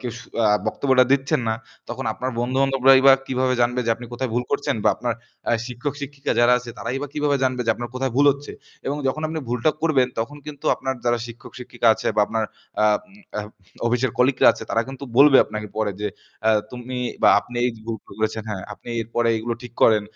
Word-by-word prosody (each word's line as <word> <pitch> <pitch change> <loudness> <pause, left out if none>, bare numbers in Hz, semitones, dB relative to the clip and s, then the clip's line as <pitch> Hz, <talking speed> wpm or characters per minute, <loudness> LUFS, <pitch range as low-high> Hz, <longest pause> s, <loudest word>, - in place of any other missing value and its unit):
কেউ 120 -2 -4
স - - -10 0.2
আ - - +5 0.2
বক্তব্যটা 130 -2 +3
দিচ্ছেন 140 +1 +2
না 110 - +1 0.3
তখন - - -5
আপনার 130 +1 -3
বন্ধু-বান্ধবরাই 135 +1 +4
বা 135 - +10
কীভাবে 130 0 +1
জানবে 125 +1 +2
যে - - +2
আপনি 120 - -10
কোথায় 120 0 -3
ভুল 120 - +1
করছেন 145 0 0
বা - - +6
আপনার 120 -2 -2 0.4
আ - - +3
শিক্ষক-শিক্ষিকা 140 +2 -4
যারা 120 +1 +5
আছে 120 -1 -9
তারাই 125 +3 -3
বা - - -2
কিভাবে 145 -1 +1
জানবে 130 -1 0
যে - - +4
আপনার 120 +1 -6
কোথায় 130 -1 -1
ভুল 145 +1 +5
হচ্ছে। 140 +1 -10 0.3
এবং 140 - -1
যখন 155 +4 -2
আপনি 160 +1 -4
ভুলটা 120 +5 +2
করবেন 150 -6 +3
তখন 115 +6 -3
কিন্তু 145 -2 -9
আপনার 130 0 -3
যারা 120 0 +2
শিক্ষক-শিক্ষিকা 120 +1 -6
আছে - - -6
বা - - +5
আপনার 110 -1 -1 0.4
আ - - +5 0.2
উম 200 - -20 0.2
আ - - +1 0.5
অফিসের 125 +2 +1
কলিগরা 130 +1 +5
আছে - - -9
তারা 115 - +2
কিন্তু 135 +1 -7
বলবে 140 0 +8
আপনাকে 105 0 -6
পরে 110 -2 0
যে 105 - -1 0.4
আ - - +6 0.2
তুমি 125 +1 -7 0.3
বা - - +7
আপনি 120 - -10
এইযে 115 -3 -2
ভুল 115 -1 -2 0.2
করেছেন 110 0 -1
হ্যাঁ, 95 -3 -4
আপনি - - -12
এরপরে 115 +1 -1
এগুলো 115 +1 -3
ঠিক 120 - -9
করেন 110 -2 +5
125 Hz, 210 wpm, -22 LUFS, 120-135 Hz, 0.5 s, বা